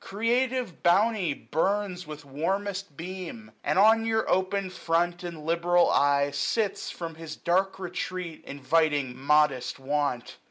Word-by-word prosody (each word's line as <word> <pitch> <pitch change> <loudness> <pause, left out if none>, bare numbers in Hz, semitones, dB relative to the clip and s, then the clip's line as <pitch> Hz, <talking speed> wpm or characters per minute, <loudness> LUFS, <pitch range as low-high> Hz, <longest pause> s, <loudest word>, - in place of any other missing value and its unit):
Creative 235 0 -1
Bounty 195 -1 +3
burns 190 +5 -1
876 - - -21
With 150 -1 -9
warmest 190 +4 -3
beam; 185 +5 -7
and - - 0
on 220 +3 +6
your 220 -1 0
open 190 +1 0
front 175 0 0
And 165 -3 -7
liberal 170 +2 +3
eye, 140 0 +3
sits, 215 +6 -1
from 165 -2 -6
his 160 -1 -8
dark 190 +4 0
retreat 180 -2 -5
Inviting 145 -1 +1
modest 140 -2 +2
want. 140 -2 -2
175 Hz, 130 wpm, -27 LUFS, 150-195 Hz, -, on